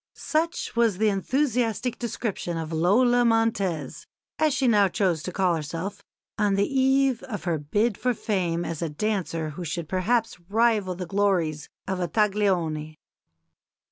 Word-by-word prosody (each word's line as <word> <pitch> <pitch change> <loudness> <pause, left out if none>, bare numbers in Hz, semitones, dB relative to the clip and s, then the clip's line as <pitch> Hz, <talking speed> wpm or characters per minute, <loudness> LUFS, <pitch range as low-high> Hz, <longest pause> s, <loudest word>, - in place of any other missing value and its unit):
Such 330 -2 -2
was 230 -5 +2
the 215 +1 +3
enthusiastic 245 +2 0
description 215 -7 -3
of 160 0 -4
Lola 240 +9 +4
Montez 205 - 0 0.3
(as 310 -1 +3
she 265 -1 +1
now 205 -4 +5
chose 185 -5 0
to 180 - -5
call 185 -2 +1
herself) 165 +5 -5 0.4
on 205 -2 +2
the 200 +1 +2
eve 265 -2 +2
of 210 -5 -6
her 170 -3 -1
bid 205 +9 0
for 250 -1 +1
fame 175 -6 -1
as 165 -1 -4
a 165 - -1
dancer 165 -2 -2
who 175 +4 -7
should 165 0 -4
perhaps 210 +4 0
rival 215 -4 +2
the 180 +1 -5
glories 175 -6 0 0.2
of 190 -1 -2
a 175 - 0
Taglioni. 175 -6 0
200 Hz, 150 wpm, -25 LUFS, 170-230 Hz, 0.4 s, now